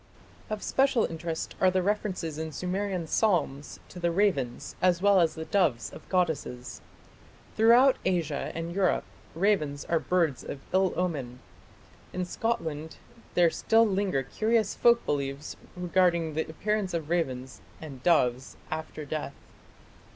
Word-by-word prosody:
Of 215 -1 -4
special 265 -4 +2
interest 165 0 -4
are 185 - +6
the 185 0 +1
references 185 -6 -2
in 160 0 -4
Sumerian 185 +2 -2
psalms 155 -7 0
to 180 - -10
the 175 -1 +1
ravens 165 -10 0
as 180 -2 +3
well 200 0 +5
as 165 -3 +2
the 160 - -5
doves 170 -13 +1
of - - -12
goddesses. 160 -9 -1 0.7
Throughout 240 +4 +6
Asia 170 -6 -1
and 165 +1 -4
Europe 190 -1 +2 0.3
ravens 160 -6 +1
are 165 - +1
birds 165 -8 0
of 140 - -6
ill 190 0 +3
omen. 140 -9 -2 0.8
In 180 0 -2
Scotland 160 -7 -3 0.4
there 175 -2 +5
still 225 +6 +3
linger 195 -9 0
curious 220 - +1
folk 235 0 +4
beliefs 140 0 -3 0.2
regarding 175 -2 +2
the 160 +1 -2
appearance 205 +2 -1
of 160 -1 -4
ravens 130 - -2 0.2
and 140 -5 -9
doves 130 -6 +2
after 155 -1 -5
death. 155 +1 -4
170 Hz, 135 wpm, -28 LUFS, 150-195 Hz, 0.8 s, are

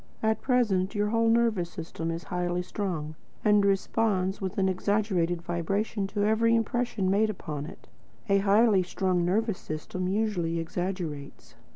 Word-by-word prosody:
At 220 -1 +1
present 215 -7 +1
your 205 0 +1
whole 230 +1 +2
nervous 225 -7 +2
system 165 0 -5
is 165 +1 -4
highly 180 0 -2
strung, 175 -6 -3 0.3
and 210 -1 +5
responds 195 -1 +1
with 190 -2 -4
an 190 -1 +2
exaggerated 185 -3 0
vibration 195 +5 -1
to 205 +1 -2
every 225 +2 +3
impression 230 -3 0
made 215 +2 +3
upon 150 -7 -5
it. - - -12 0.4
A 200 -1 +4
highly 205 0 +4
strung 180 0 0
nervous 205 +3 0
system 170 +4 -4
usually 185 -5 0
exaggerates. 165 -4 -5
195 Hz, 145 wpm, -28 LUFS, 175-215 Hz, 0.4 s, and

